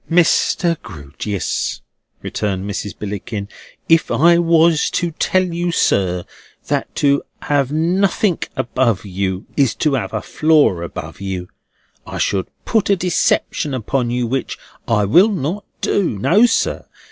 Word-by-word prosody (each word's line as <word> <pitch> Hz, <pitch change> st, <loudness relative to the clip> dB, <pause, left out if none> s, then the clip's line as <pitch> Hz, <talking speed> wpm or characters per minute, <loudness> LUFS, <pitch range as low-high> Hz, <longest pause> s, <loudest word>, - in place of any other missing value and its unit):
"Mr. 170 Hz, 0 st, +2 dB
Grewgious," 90 Hz, +2 st, -4 dB, 0.4 s
returned 95 Hz, -2 st, -3 dB
Mrs. 105 Hz, 0 st, -5 dB
Billickin, 105 Hz, 0 st, -5 dB, 0.4 s
"if 165 Hz, 0 st, +4 dB
I 170 Hz, +2 st, +4 dB
was 165 Hz, -2 st, +3 dB
to 175 Hz, -1 st, 0 dB
tell 185 Hz, +4 st, +1 dB
you, 175 Hz, -1 st, -2 dB
sir, 90 Hz, -, +1 dB, 0.4 s
that -, -, -2 dB
to 140 Hz, -1 st, +2 dB, 0.2 s
have 140 Hz, -2 st, +1 dB
nothink 180 Hz, +4 st, +1 dB
above 125 Hz, -5 st, 0 dB
you 95 Hz, 0 st, -3 dB
is 135 Hz, -5 st, +2 dB
to 150 Hz, -3 st, +1 dB
have 135 Hz, -, -1 dB
a -, -, -3 dB
floor 155 Hz, -, +3 dB
above 85 Hz, +3 st, -7 dB
you, 95 Hz, -2 st, -4 dB, 0.6 s
I -, -, -6 dB
should 95 Hz, -2 st, 0 dB, 0.2 s
put 220 Hz, -4 st, +1 dB
a 200 Hz, -, +5 dB
deception 170 Hz, -4 st, 0 dB
upon 125 Hz, +1 st, -1 dB
you 120 Hz, 0 st, 0 dB
which 130 Hz, +2 st, -3 dB, 0.3 s
I 105 Hz, -3 st, +2 dB
will 175 Hz, -, +5 dB
not 190 Hz, +1 st, -3 dB, 0.2 s
do. 180 Hz, -, 0 dB
No, 205 Hz, -, +4 dB
sir. -, -, -1 dB
135 Hz, 135 wpm, -18 LUFS, 100-170 Hz, 0.6 s, a